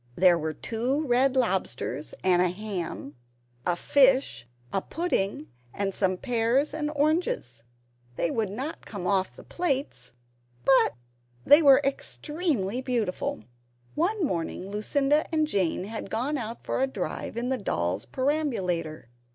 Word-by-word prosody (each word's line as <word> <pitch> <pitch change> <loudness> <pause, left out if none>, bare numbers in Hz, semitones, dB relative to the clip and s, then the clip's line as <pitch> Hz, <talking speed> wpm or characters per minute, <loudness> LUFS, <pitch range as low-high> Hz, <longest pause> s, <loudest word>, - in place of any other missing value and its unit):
There 175 -1 +5
were 155 -1 -3
two 250 - -1
red 260 +1 +3
lobsters 180 - -1
and 180 -1 +4
a 180 - +3
ham, 180 -7 -5 0.5
a 175 - +2
fish, 260 - +3 0.3
a 195 - +1
pudding, 195 - -2 0.2
and 195 -1 -1
some 185 -1 +1
pears 245 +5 +1
and 300 -1 -2
oranges. 290 - 0 0.5
They 170 - 0
would 220 -3 0
not 265 +11 -5
come 200 -4 -6
off 190 0 +1
the - - -12
plates, 290 - -2 0.5
but 265 - +5 0.5
they 290 +3 +8
were 280 -2 +7
extremely 275 - -1
beautiful. 230 - -2 0.5
One 370 +3 +1
morning 180 - -3
Lucinda 280 +8 +1
and 310 -1 +2
Jane 190 - 0
had 215 0 -6
gone 255 +9 -1
out 230 -3 -5
for - - -1
a 265 - +3
drive 265 - -4
in 240 +2 -1
the 260 -1 0
doll's 90 - -1
perambulator. 200 - -1
230 Hz, 135 wpm, -27 LUFS, 185-280 Hz, 0.5 s, they